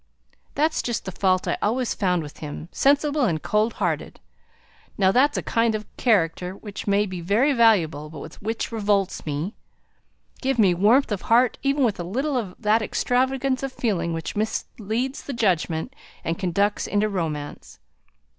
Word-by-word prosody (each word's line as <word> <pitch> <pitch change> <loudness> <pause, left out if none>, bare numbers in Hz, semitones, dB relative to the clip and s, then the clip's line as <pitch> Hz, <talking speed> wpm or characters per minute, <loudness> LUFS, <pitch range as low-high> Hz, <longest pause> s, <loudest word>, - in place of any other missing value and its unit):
"That's 310 +2 +1
just 235 -2 -3
the 190 - -4
fault 185 0 +1
I - - -1
always 245 +3 0
found 180 -4 0
with 150 - -10
him; 155 +2 -7
sensible 290 +1 +2
and 165 -7 0
cold 215 +7 +1
hearted! - - -2 0.8
Now, 190 -2 +4
that's 265 +7 +3
a - - -2
kind 230 -1 +1
of 215 0 -4
character 180 -5 +1
which 205 0 -8
may 200 +1 +3
be 185 -3 -6
very 220 - +2
valuable, 170 - +3
but 155 -2 -9
which 225 +3 -3
revolts 205 -3 0
me. 150 +8 -2 0.9
Give 270 -1 0
me 195 -5 +5
warmth 220 +9 +3
of 205 - -1
heart, 240 +1 +3
even 275 0 +1
with 215 -6 +1
a - - -2
little 265 - -2
of 210 -7 -2
that 220 0 +2
extravagance 260 +4 0
of 270 -1 -3
feeling 200 -10 -1
which 165 -2 -4
misleads 220 +3 -2
the 280 - -6
judgment, 185 -2 0 0.3
and 165 0 -2
conducts 200 +3 0
into 205 +1 +1
romance. 160 -7 -4
210 Hz, 165 wpm, -24 LUFS, 180-245 Hz, 0.9 s, me